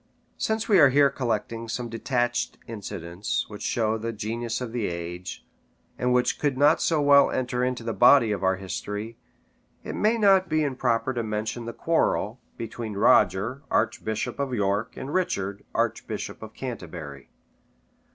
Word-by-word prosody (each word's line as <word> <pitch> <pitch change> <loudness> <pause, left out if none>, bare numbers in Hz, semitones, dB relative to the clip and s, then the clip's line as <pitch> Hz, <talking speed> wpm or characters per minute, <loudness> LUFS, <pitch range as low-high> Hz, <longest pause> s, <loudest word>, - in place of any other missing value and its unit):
] - - -41
Since 220 0 -1
we 200 -5 +5
are 140 -3 +8
here 140 +1 +4
collecting 115 -3 -2
some 120 +1 -3
detached 120 +1 -1
incidents, 100 -4 -4
which 105 -1 -9
show 110 -1 0
the 115 +1 -3
genius 115 +2 -3
of 125 -3 -5
the 115 -3 -1
age, 85 +1 -6 0.5
and 125 0 0
which 125 0 +2
could 145 -3 0
not 145 +3 +4
so 160 -2 +2
well 140 -1 +6
enter 125 -1 -1
into 125 -2 -1
the 115 -1 -2
body 120 -2 +6
of 100 -2 -2
our 95 0 +3
history, 105 +4 -5 0.6
it - - -5
may 220 +2 +2
not 195 -4 +4
be 155 -1 +2
improper 130 -2 0
to 120 - -1
mention 110 +2 -3
the 115 - -4
quarrel 130 -8 0 0.2
between 115 -1 -5
Roger, 110 +2 +3
archbishop 110 +4 -1
of 135 -3 -1
York, 100 +1 -1
and 140 - -5
Richard, 100 - -1
archbishop - - -2
of 110 0 -10
Canterbury. 85 - -7
115 Hz, 160 wpm, -26 LUFS, 105-130 Hz, 0.6 s, are